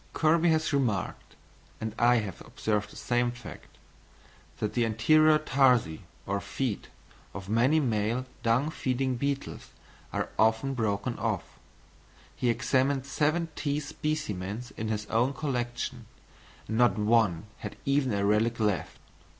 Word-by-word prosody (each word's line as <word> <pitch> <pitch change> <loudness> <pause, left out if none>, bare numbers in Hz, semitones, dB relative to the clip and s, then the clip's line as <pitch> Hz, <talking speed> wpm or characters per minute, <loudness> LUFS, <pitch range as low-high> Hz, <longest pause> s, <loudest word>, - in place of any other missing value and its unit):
Kirby 165 +2 +3
has 160 -1 +1
remarked 120 -8 -1 0.4
(and 110 -1 -4
I 120 +1 +5
have 105 -6 -2
observed 105 -1 -2
the - - -14
same 120 0 +1
fact) 120 -1 -11 0.8
that 105 - -2
the 120 - +2
anterior 155 +8 +4
tarsi, 130 - +2 0.2
or 100 +1 -1
feet, 110 +3 -3 0.5
of 95 -1 -7
many 120 +9 +3
male 115 -1 0 0.2
dung 125 +7 +2
feeding 130 -2 -1
beetles 140 +2 -3 0.4
are - - -2
often 110 +5 +3
broken 110 -1 -1
off; 105 -3 -1 0.9
he 125 - 0
examined 130 +3 +1
seventeen 150 0 0
specimens 120 -8 -4
in 110 - -4
his 105 -1 -2
own 120 +6 +1
collection, 120 -4 -3 0.6
and 110 +2 -1
not 120 -1 +4
one 105 -5 +2
had 105 - -6
even 140 -2 +2
a 100 -1 0
relic 110 +3 +2
left. 105 -4 -1
120 Hz, 130 wpm, -28 LUFS, 110-140 Hz, 0.9 s, I